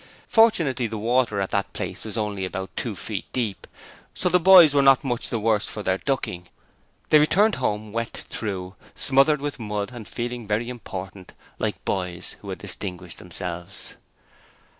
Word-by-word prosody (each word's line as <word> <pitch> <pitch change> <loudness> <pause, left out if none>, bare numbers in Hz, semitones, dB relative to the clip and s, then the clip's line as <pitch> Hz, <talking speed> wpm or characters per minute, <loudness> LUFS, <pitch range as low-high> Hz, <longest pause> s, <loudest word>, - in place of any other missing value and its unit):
Fortunately 165 - +3
the 110 - -5
water 115 -1 +1
at 95 - -2
that 100 -1 -1
place - - -5
was 110 +1 -5
only 105 -3 -2
about 95 0 -5
two - - -3
feet - - -5
deep, 115 -6 -2 0.5
so 180 - 0
the 180 +1 +4
boys 175 -4 +8
were 140 - +5
not 135 +1 +6
much 120 -4 -2
the 115 - -1
worse 110 -1 +1
for 105 - -6
their 95 0 0
ducking. 90 -10 -2 0.6
They 155 - +8
returned 205 +8 +4
home 105 0 -1
wet 115 0 -4
through, 95 -4 -4 0.2
smothered 140 +2 +3
with 145 -2 -4
mud, 105 -1 -3
and 120 -4 -9
feeling 120 -1 -4
very 110 +3 0
important, 95 -5 -8 0.3
like - - -3
boys 90 -2 -3
who 100 - -9
had 95 - -4
distinguished 90 -2 -5
themselves. 90 -1 -6
110 Hz, 165 wpm, -24 LUFS, 95-135 Hz, 0.6 s, boys